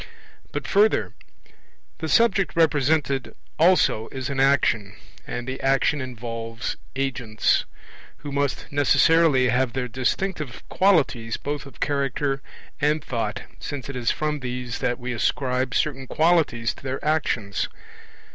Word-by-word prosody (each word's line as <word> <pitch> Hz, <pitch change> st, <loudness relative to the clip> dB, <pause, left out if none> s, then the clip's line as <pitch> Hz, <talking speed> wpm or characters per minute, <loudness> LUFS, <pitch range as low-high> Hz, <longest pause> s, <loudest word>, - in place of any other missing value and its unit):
But -, -, -4 dB
further: 210 Hz, +2 st, +3 dB, 0.9 s
the 160 Hz, -, -3 dB
subject 200 Hz, -3 st, +3 dB
represented 150 Hz, -4 st, +2 dB, 0.2 s
also 165 Hz, -10 st, +4 dB
is 130 Hz, 0 st, -4 dB
an 135 Hz, -, -2 dB
action; 115 Hz, -7 st, +2 dB, 0.3 s
and 120 Hz, -, -4 dB
the 130 Hz, 0 st, -4 dB
action 135 Hz, +2 st, +2 dB
involves 115 Hz, -2 st, -5 dB, 0.2 s
agents, 125 Hz, -5 st, 0 dB, 0.5 s
who 145 Hz, -, -7 dB
must 140 Hz, -1 st, -1 dB
necessarily 145 Hz, -1 st, +4 dB
have 125 Hz, +1 st, +1 dB
their 130 Hz, -1 st, -2 dB
distinctive 135 Hz, +4 st, -2 dB
qualities 140 Hz, -, +2 dB
both 145 Hz, 0 st, -4 dB
of 130 Hz, -, -15 dB
character 140 Hz, -1 st, 0 dB, 0.4 s
and 150 Hz, +1 st, +1 dB
thought, 115 Hz, -4 st, -3 dB, 0.2 s
since 140 Hz, -2 st, -6 dB
it 140 Hz, -, -5 dB
is 120 Hz, -2 st, 0 dB
from 150 Hz, -1 st, -1 dB
these 125 Hz, -2 st, -4 dB
that 120 Hz, -, 0 dB
we 125 Hz, 0 st, -4 dB
ascribe 125 Hz, +2 st, 0 dB
certain 135 Hz, -3 st, 0 dB
qualities 155 Hz, -9 st, +2 dB
to -, -, -15 dB
their 135 Hz, +1 st, -4 dB
actions. 120 Hz, -10 st, 0 dB
135 Hz, 130 wpm, -24 LUFS, 125-150 Hz, 0.9 s, also